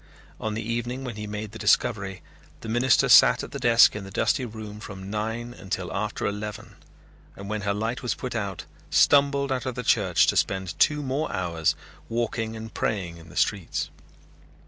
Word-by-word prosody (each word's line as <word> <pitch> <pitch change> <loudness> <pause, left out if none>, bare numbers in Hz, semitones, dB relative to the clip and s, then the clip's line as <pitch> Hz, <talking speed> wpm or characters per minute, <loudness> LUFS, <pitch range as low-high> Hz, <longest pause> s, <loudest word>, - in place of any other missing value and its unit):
On 110 -1 -3
the 110 - -3
evening 120 +3 -3
when 125 -4 -5
he 105 0 -6
made 105 0 -5
the 110 - -10
discovery 95 -2 +1 0.4
the - - -8
minister 120 +2 +3
sat - - +7
at - - -8
the - - -5
desk 115 -2 +6
in 105 - -5
the 95 - -9
dusty 130 +6 +1
room 110 -2 -8
from 95 -2 -8
nine 110 +3 -3
until 95 -4 -5
after 105 +1 -2
eleven 105 +1 -5 0.6
and 100 - -9
when 110 -1 -2
her 100 0 0
light 110 +4 -2
was 125 - -1
put 125 - -5
out 100 -6 -4 0.2
stumbled 140 -1 +4
out 130 -1 -1
of 125 - -3
the 125 - -4
church 95 -7 +3
to - - +1
spend 95 -1 -1
two 150 -1 +3
more 140 +4 -2
hours 85 -3 0 0.3
walking 115 -1 -2
and 110 0 -8
praying 90 -6 -2
in 80 0 -14
the 85 - -14
streets. 90 +3 0
110 Hz, 190 wpm, -26 LUFS, 100-120 Hz, 0.6 s, sat